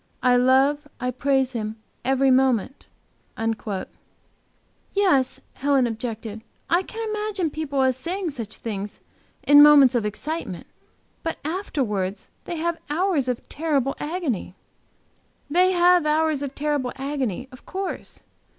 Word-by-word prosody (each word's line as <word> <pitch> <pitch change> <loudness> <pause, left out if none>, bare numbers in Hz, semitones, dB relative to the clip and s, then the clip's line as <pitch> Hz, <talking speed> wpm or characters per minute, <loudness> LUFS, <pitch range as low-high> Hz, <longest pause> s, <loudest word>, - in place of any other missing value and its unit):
I 250 -1 +5
love, 270 +4 +3
I 250 -1 -1
praise 265 0 +1
Him 220 -3 -4 0.3
every 265 +1 +3
moment.'" 260 -1 +1 2.1
"Yes," 275 -10 +2
Helen 275 -2 +2
objected, 225 -2 -5 0.3
"I 345 +2 +4
can 450 +3 -6
imagine 420 -6 -2
people 285 -3 -1
as 260 -1 +2
saying 350 +4 -3
such 230 -6 -6
things 205 -2 -5 0.4
in 290 0 +8
moments 290 -3 +8
of 240 -3 +1
excitement; 215 - -4 0.6
but 325 - -3
afterwards, 230 - -2 0.2
they 345 - -4
have 335 +1 -2
hours 320 -3 +1
of 250 -2 -3
terrible 285 -4 0
agony." 295 - -3 1.0
"They 365 +3 +4
have 350 -2 +4
'hours 310 -1 +2
of 280 -1 -5
terrible 290 -4 -1
agony,' 265 -4 -3
of 255 - -15
course. 385 0 -5
275 Hz, 125 wpm, -24 LUFS, 250-325 Hz, 2.1 s, in